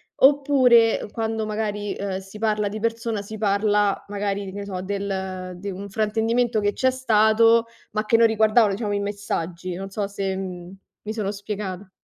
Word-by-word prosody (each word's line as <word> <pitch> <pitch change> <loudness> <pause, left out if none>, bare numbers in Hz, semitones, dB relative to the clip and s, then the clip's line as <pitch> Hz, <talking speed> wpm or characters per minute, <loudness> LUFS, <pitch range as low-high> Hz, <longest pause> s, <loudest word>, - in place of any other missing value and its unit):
oppure 265 -6 +4
quando 225 -1 -2
magari, 210 -1 -3
uhm, 195 -1 -2
si 195 +2 -10
parla 210 -2 +1
di 215 +2 -5
persona, 230 -1 -2
si 215 +2 -8
parla 205 -1 +1
magari 200 0 -2
di 190 - -7
ne 200 0 -5
so, 185 -2 -5
del 190 -2 -4
de 200 +2 -6
un 195 +2 -6
fraintendimento 225 +3 +1
che 205 -1 +1
c'è 260 - +2
stato, 230 -2 +4 0.2
ma 215 0 -1
che 230 - +4
non 230 - +6
riguardavano 220 -1 +4
diciamo 205 0 -2
i - - 0
messaggi, 185 -3 -4
non 195 +1 -6
so 200 -1 -2
se, 195 -1 -3
mhmm, 185 -1 -6 0.3
mi 215 +1 -4
sono 210 -3 -2
spiegata. 200 -2 -6
205 Hz, 175 wpm, -23 LUFS, 195-220 Hz, 0.3 s, non